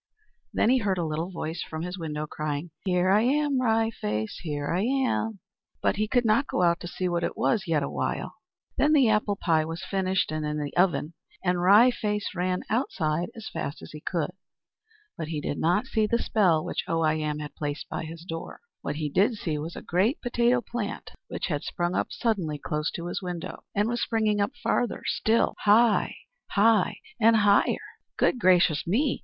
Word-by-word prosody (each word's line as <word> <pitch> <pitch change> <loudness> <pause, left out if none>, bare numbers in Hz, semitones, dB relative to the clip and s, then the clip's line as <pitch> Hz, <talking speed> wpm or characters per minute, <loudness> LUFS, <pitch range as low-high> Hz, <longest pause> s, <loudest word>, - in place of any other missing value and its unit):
Then 230 - +3
he 260 - +4
heard 200 -4 0
a 170 - -1
little 160 +3 -2
voice 165 -2 -4
from 160 0 -5
his 180 +1 -4
window, 150 -2 -3
crying, 150 +2 -4
"Here 180 0 +2
I 205 +2 +5
am, 280 +2 +2
Wry 225 -2 +2
Face, 105 - -3
here 145 -2 -3
I 180 - +1
am!" 240 -4 0 0.4
But - - +1
he 215 +1 +1
could 245 +2 +2
not 225 +6 +3
go 180 - 0
out 170 0 +3
to 175 - -7
see 180 +1 -2
what 175 -1 -1
it - - -2
was 210 -5 +1
yet 155 -3 +1
awhile. - - -3 0.4
Then 300 +2 +4
the 270 -6 +5
apple 210 -1 +2
pie 160 -5 +2
was 165 +3 -5
finished, 190 -3 0
and 155 0 -2
in 150 0 -2
the 145 -1 -4
oven; 175 -3 +2 0.3
and 180 -1 +1
Wry 210 +7 +7
Face 210 -3 -2
ran 180 0 -1
outside 175 - 0
as 225 -1 -8
fast 140 - -4
as - - -10
he 150 - -9
could. 170 -2 -2 0.9
But 160 - -3
he 155 -2 -3
did 145 - -3
not 180 +8 +2
see 220 -4 +1
the 235 - +2
spell 180 -9 +2
which - - -2
Oh 165 0 0
I 155 -1 +3
Am 155 -1 -2
had 150 -1 -6
placed 145 0 -4
by - - -4
his 165 +1 -9
door. 165 -2 -6 0.2
What - - -3
he 155 0 -2
did 200 - +2
see 160 -7 -3
was 160 +3 -6
a - - -8
great 195 - +1
potato 245 0 +2
plant 235 -4 -5 0.2
which - - -4
had 145 -4 -1
sprung 175 0 -2
up - - 0
suddenly 190 -11 -1
close 150 +1 -2
to 170 - -5
his 175 - -3
window, 180 -3 -6
and 205 +1 +2
was 240 +1 -1
springing 215 -2 +1
up 200 +7 0
farther 235 0 0
still, 225 +1 +2
high, 215 +1 +4 0.3
high, 215 -1 +3 0.2
and 225 0 +6
higher. 205 -2 +4 0.4
"Good 250 - +2
gracious 180 -6 +4
me!" 255 - +1
185 Hz, 200 wpm, -27 LUFS, 160-220 Hz, 0.9 s, Wry